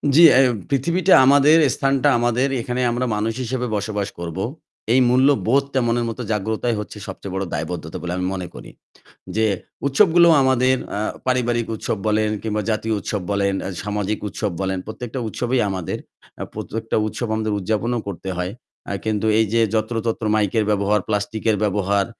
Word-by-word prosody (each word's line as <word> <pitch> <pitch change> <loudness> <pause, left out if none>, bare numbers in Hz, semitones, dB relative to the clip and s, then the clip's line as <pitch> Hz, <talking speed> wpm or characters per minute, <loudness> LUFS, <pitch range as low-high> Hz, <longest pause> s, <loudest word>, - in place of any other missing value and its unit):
জ্বী, 165 - +8
এ্যাই 130 0 +6 0.2
পৃথিবীটা 170 +7 +2
আমাদের, 145 +3 +6 0.2
স্থানটা 135 +1 +2
আমাদের 120 +2 +1
এখানে 125 +2 -2
আমরা 120 +2 -1
মানুষ 110 +2 -1
হিসেবে 125 +1 -2
বসবাস 105 -1 -2
করব। 85 0 -5 0.6
এই 130 - +5
মূল্যবোধটা 135 +1 +2
মনের 120 0 +1
মত 115 - -7
জাগ্রতাই 110 +3 -1
হচ্ছে 105 0 -7
সবচেয়ে 95 0 -7
বড় 95 0 -1
দায়বদ্ধতা 80 -2 -4
বলে 90 0 -4
আমি 90 0 -1
মনে 90 -2 -4
করি। - - -10 0.7
যে 110 0 +2 0.4
উৎসবগুলো 170 +3 +5
আমাদের 130 0 +3 0.2
আ - - -1 0.3
পারিবারিক 120 -2 +1
উৎসব 110 - -3
বলেন 110 0 +2
কিংবা 105 -1 -2
জাতীয় 110 +1 -1
উৎসব 105 0 -3
বলেন, 100 -1 +1
আ - - -3
সামাজিক 105 0 -2
উৎসব 105 0 -3
বলেন 95 0 -1
প্রত্যেকটা 120 +3 -6
উৎসবই 120 +3 -1
আমাদের। 95 -3 -3 0.4
আ - - -1
প্রত্যেকটা 115 +1 -4
উৎসব 120 +2 -4
আমাদের 110 -1 -1
উদযাপনও 110 +5 -1
করতে 95 -1 -5
হয়। 90 +1 -2 0.4
আ - - -1
কিন্তু 110 -1 -1
এই 110 - +4
যে 115 - +3 0.2
যত্র-তত্র 110 +1 -1
মাইকের 110 +1 +1
ব্যবহার 105 0 +2
প্লাস্টিকের 110 +1 0
ব্যবহার 100 -1 +1
110 Hz, 160 wpm, -21 LUFS, 100-125 Hz, 0.7 s, জ্বী